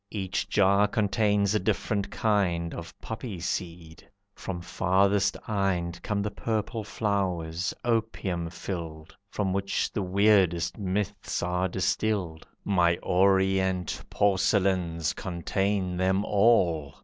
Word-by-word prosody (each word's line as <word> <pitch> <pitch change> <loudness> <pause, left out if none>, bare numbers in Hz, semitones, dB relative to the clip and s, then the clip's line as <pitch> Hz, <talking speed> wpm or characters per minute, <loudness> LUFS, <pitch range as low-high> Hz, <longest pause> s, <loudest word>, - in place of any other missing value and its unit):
Each 95 -2 -3
jar 100 0 +4
contains 105 -1 +1
a 110 - +2
different 100 0 -1
kind 90 -6 0
Of 85 - -9
poppy 110 -4 -6
seed. 85 -1 -5 0.2
From 95 -3 -5
farthest 95 +3 +1
Ind 90 -5 -1
Come 100 -1 -1
the 105 - -2
purple 110 +1 -2
flowers, 90 -5 -1
opium 110 -7 -1
filled, 80 -2 -7
From 95 -2 -1
which 100 0 -1
the 105 - -1
weirdest 95 -2 +2
myths 100 -1 -2
are 90 +1 0
distilled; 95 -2 -1 0.2
My 85 -3 +3
orient 95 -1 +2
porcelains 95 -5 +1
contain 95 +1 -2
them 95 +2 +1
all. 90 - +2
95 Hz, 110 wpm, -27 LUFS, 85-100 Hz, 0.2 s, jar